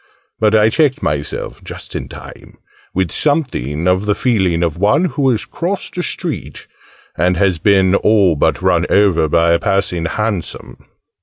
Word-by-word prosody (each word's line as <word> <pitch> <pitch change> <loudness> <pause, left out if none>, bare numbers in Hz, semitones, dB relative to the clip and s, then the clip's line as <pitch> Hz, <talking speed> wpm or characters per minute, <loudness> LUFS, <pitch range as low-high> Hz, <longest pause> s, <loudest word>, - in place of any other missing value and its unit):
but 110 0 +3
I 110 0 +4
checked 145 +2 +1
myself 75 -1 -4
just - - -10
in - - -5
time - - -12 0.3
with 95 -3 -1
something 90 - -1
of 95 +3 +1
the 105 - +2
feeling 95 -9 +1
of 85 -1 -2
one 120 - +3
who 140 -4 0
has 115 -4 -1
crossed 185 +4 -4
a 180 - -2
street, - - -5 0.5
and 90 +1 +1
has 90 -2 +1
been 95 0 +3
all 100 -4 +3
but 75 - 0
run 90 -2 +2
over 95 -6 +3
by 85 +2 +2
a 85 - +3
passing 90 -3 -1
'Hansom.' 105 0 -4
95 Hz, 160 wpm, -16 LUFS, 85-110 Hz, 0.5 s, I